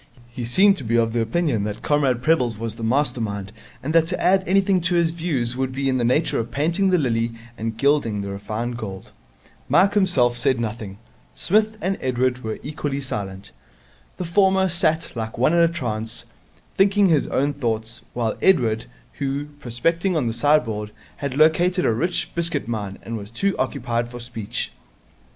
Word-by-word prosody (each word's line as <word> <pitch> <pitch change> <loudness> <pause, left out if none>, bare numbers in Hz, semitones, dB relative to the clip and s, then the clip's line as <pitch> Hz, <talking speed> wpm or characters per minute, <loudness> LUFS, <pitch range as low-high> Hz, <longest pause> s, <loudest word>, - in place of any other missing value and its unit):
He 120 0 -5
seemed 195 - +4
to - - -5
be 115 0 0
of 115 -1 +2
the 120 - +1
opinion 115 -2 0
that 105 0 -5
Comrade 135 -5 +1
Prebble's 125 -8 +2
was 115 0 -3
the 115 - -8
master 125 +1 +2
mind 100 -2 -4 0.3
and 155 +4 -2
that 165 -1 +4
to 180 - -1
add 190 +1 +3
anything 190 0 +3
to 175 +1 0
his 170 -1 +3
views 145 -8 -2
would 130 0 -1
be 135 +1 -2
in 130 -1 +1
the - - 0
nature 130 +7 +1
of 115 0 -3
painting 170 +8 +1
the 185 - +4
lily 115 -5 0 0.2
and 115 -1 -4
gilding 140 -7 +2
the 100 0 -5
refined 110 +5 -4
gold. 95 -5 -7 0.6
Mike 180 +9 +4
himself 175 - +3
said 125 +1 +1
nothing. 110 -3 -4 0.4
Psmith 215 +3 +2
and 195 +1 -1
Edward 125 0 0
were 110 -1 -3
equally 145 -1 -3
silent. 100 -7 -5 0.7
The 180 - -3
former 190 +2 +3
sat 165 -2 0
like 110 -1 -4
one 130 +7 +3
in 170 - +4
a 170 - +6
trance, 115 -9 -2 0.5
thinking 195 0 +4
his 155 -4 +2
own 145 +2 0
thoughts, 115 -3 -3
while 115 -3 -1
Edward, 115 -12 +3 0.3
who, 140 +1 -2
prospecting 165 +10 0
on 145 - 0
the 115 - -1
sideboard, 115 -5 +2 0.3
had 140 -2 -4
located 175 +4 +3
a - - +3
rich 175 +10 -1
biscuit 170 -7 -2
mine, 105 -4 -4 0.2
was 100 -2 -7
too 195 - -1
occupied 120 -2 -1
for 120 0 -8
speech. 115 -3 -4
130 Hz, 180 wpm, -22 LUFS, 115-170 Hz, 0.7 s, a